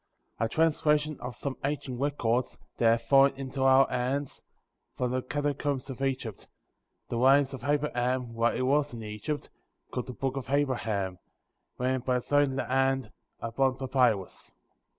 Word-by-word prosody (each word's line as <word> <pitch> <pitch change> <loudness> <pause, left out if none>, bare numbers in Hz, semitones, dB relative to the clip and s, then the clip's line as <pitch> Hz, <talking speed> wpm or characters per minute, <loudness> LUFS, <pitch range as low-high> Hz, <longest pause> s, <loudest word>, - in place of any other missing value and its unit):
Translation 155 0 +2
of 125 -1 -6
some 135 +2 -4
ancient 135 -3 -3
Records, 130 -4 0 0.2
that 115 - +4
have 115 0 +2
fallen 135 +3 +5
into 135 0 -5
our 135 0 +6
hands, 135 +3 -2 0.6
from 125 -1 0
the 130 0 0
catacombs 145 -1 -2
of 130 - -8
Egypt; 130 -6 -3 0.6
the 120 - -2
writings 135 +2 +5
of 135 - -7
Abraham 130 -4 0
while 115 +1 +1
he - - -1
was 140 0 +1
in 115 - -7
Egypt, 105 +8 -5 0.4
called 125 - -3
the 125 - -6
Booh 135 +1 -2
of 130 - -5
Abraham, 110 -10 0 0.6
written 130 +1 0
by 125 0 0
his 125 +3 -3
own 145 -2 +3
hand, 135 -3 +1 0.3
upon 130 +3 0
papyrus. 125 -7 0
130 Hz, 150 wpm, -29 LUFS, 120-140 Hz, 0.6 s, our